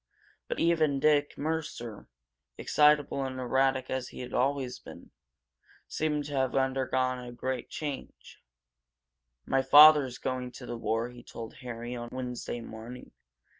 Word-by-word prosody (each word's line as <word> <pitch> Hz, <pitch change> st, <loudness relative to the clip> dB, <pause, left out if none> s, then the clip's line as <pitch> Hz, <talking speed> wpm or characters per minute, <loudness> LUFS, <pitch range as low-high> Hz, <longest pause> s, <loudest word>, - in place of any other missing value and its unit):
But -, -, -3 dB
even 160 Hz, -4 st, +2 dB
Dick 145 Hz, 0 st, +2 dB
Mercer, 145 Hz, -8 st, -4 dB, 0.5 s
excitable 150 Hz, -2 st, +3 dB
and 130 Hz, -1 st, -4 dB
erratic 130 Hz, +1 st, +1 dB
as 130 Hz, -1 st, -2 dB
he -, -, -9 dB
had 125 Hz, -, -8 dB
always 130 Hz, -1 st, 0 dB
been, -, -, -13 dB, 0.8 s
seemed 150 Hz, -2 st, -1 dB
to 145 Hz, -, -7 dB
have 130 Hz, -2 st, 0 dB
undergone 130 Hz, -1 st, 0 dB
a 120 Hz, -, -8 dB
great 125 Hz, 0 st, -4 dB
change. 145 Hz, -3 st, -7 dB, 1.0 s
"My 135 Hz, -, +2 dB
father's 145 Hz, -1 st, +7 dB
going 125 Hz, -1 st, -4 dB
to 125 Hz, -, -9 dB
the 120 Hz, -, -5 dB
war," 115 Hz, +1 st, -1 dB
he 125 Hz, 0 st, -12 dB
told 115 Hz, -1 st, -9 dB
Harry 120 Hz, -1 st, -6 dB
on 120 Hz, -1 st, -6 dB
Wednesday 125 Hz, -2 st, -5 dB
morning. 115 Hz, +2 st, -10 dB
130 Hz, 135 wpm, -29 LUFS, 125-145 Hz, 1.0 s, father's